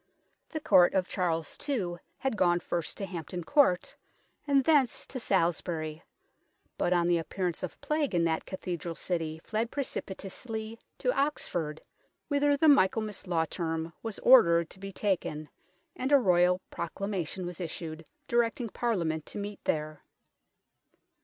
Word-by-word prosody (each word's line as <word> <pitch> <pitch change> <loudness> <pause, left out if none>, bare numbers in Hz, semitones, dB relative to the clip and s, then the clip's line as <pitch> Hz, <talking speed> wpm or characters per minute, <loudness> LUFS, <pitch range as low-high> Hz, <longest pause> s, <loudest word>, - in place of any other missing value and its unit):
The 315 - -3
Court 190 - +5
of 185 -1 +2
Charles 165 -4 -1
II. 185 -11 -1 0.2
had 265 -4 -1
gone 175 -3 +3
first 170 -1 -3
to 200 - -3
Hampton 175 -1 -5
Court, 270 - +3 0.5
and 275 -1 +4
thence 280 -5 +3
to 260 - -6
Salisbury, 165 -5 0 0.7
but 175 - 0
on 175 -1 +3
the 175 -1 +3
appearance 175 +1 -3
of 185 - -5
Plague 300 - 0
in 170 - +3
that 160 -1 0
cathedral 175 -3 -4
city 160 -3 -2
fled 225 +1 -1
precipitately 220 -2 -5 0.2
to - - 0
Oxford, 175 - -1 0.5
whither 285 0 +3
the 315 - +4
Michaelmas 215 -6 +3
law 165 -2 +1
term 165 -1 -3
was 225 -3 -5
ordered 170 -10 +6
to 190 - -11
be 195 0 -6
taken, 180 -7 -2 0.5
and 260 +2 -2
a 285 - +9
Royal 180 -5 +4
Proclamation 185 0 -3
was 175 +1 -6
issued 165 -1 -5 0.2
directing 235 -1 +1
Parliament 170 -10 -1
to - - -7
meet 205 0 -6
there. 155 -1 -1
185 Hz, 140 wpm, -30 LUFS, 170-230 Hz, 0.7 s, a